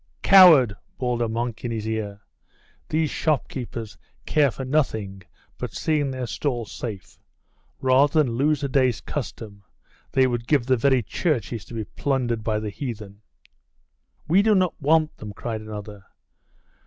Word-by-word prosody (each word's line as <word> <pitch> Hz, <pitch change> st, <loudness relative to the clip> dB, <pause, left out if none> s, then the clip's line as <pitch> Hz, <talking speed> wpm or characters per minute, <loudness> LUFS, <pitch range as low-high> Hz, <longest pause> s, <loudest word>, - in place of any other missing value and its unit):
'Coward!' 165 Hz, -, +8 dB, 0.2 s
bawled 125 Hz, -2 st, -1 dB
a 115 Hz, -, 0 dB
monk 115 Hz, 0 st, -3 dB
in 120 Hz, -, -2 dB
his 110 Hz, -2 st, -3 dB
ear. 105 Hz, -2 st, -4 dB, 0.7 s
'These 155 Hz, -1 st, 0 dB
shopkeepers 125 Hz, -7 st, -3 dB, 0.3 s
care 150 Hz, -2 st, +3 dB
for 130 Hz, +2 st, -6 dB
nothing 110 Hz, -9 st, -1 dB, 0.4 s
but -, -, -5 dB
seeing 150 Hz, -3 st, 0 dB
their 130 Hz, -1 st, -4 dB
stalls 120 Hz, -2 st, -3 dB
safe. 95 Hz, -8 st, -7 dB, 0.6 s
Rather 140 Hz, +4 st, +4 dB
than 125 Hz, -, -2 dB
lose 145 Hz, +4 st, +1 dB
a -, -, +1 dB
day's 130 Hz, -3 st, +2 dB
custom, 110 Hz, -7 st, -6 dB, 0.5 s
they 130 Hz, -, +4 dB
would 120 Hz, -2 st, -2 dB
give 140 Hz, -6 st, +2 dB
the 130 Hz, 0 st, +3 dB
very 130 Hz, 0 st, +2 dB
churches 120 Hz, -, -2 dB
to 120 Hz, -, -10 dB
be 110 Hz, -, -2 dB
plundered 120 Hz, -1 st, -2 dB
by 110 Hz, -1 st, 0 dB
the 105 Hz, -1 st, -4 dB
heathen!' 105 Hz, -4 st, -7 dB, 1.1 s
'We 180 Hz, +5 st, +5 dB
do 215 Hz, 0 st, +3 dB
not 185 Hz, -2 st, +2 dB
want 155 Hz, +2 st, +2 dB
them!' 105 Hz, -1 st, -8 dB
cried 110 Hz, +1 st, -5 dB
another. 105 Hz, -2 st, -8 dB
125 Hz, 150 wpm, -24 LUFS, 110-145 Hz, 1.1 s, Coward